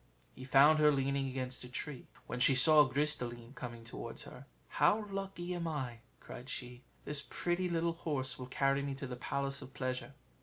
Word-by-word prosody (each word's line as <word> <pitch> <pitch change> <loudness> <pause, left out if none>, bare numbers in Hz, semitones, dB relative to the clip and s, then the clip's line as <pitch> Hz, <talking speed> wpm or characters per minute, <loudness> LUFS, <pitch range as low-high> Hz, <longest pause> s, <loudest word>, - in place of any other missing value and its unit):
He 130 - -9
found 145 +4 +6
her 150 0 +6
leaning 140 0 0
against 130 -1 -4
a 125 - -9
tree. 135 +1 -6 0.2
When 125 - -4
she 130 +2 +5
saw 150 +3 +8
Gris 150 +3 +2
de 125 - -3
line 120 +1 -10
coming 120 -4 -7
towards 115 - -7
her, - - -12 0.2
"How 210 0 +3
lucky 195 -2 -4
am 170 -1 -3
I!" 130 -7 -3 0.2
cried 125 +3 -10
she; 125 -2 -6 0.2
"this 145 -1 0
pretty 175 +1 -1
little 170 0 +1
horse 145 -6 -2
will 125 - -6
carry 135 +1 +1
me 140 -1 -3
to 140 - -6
the 125 -1 -5
Palace 140 +2 -3
of 135 - -11
Pleasure." 130 +1 -3
135 Hz, 195 wpm, -34 LUFS, 125-155 Hz, 0.2 s, saw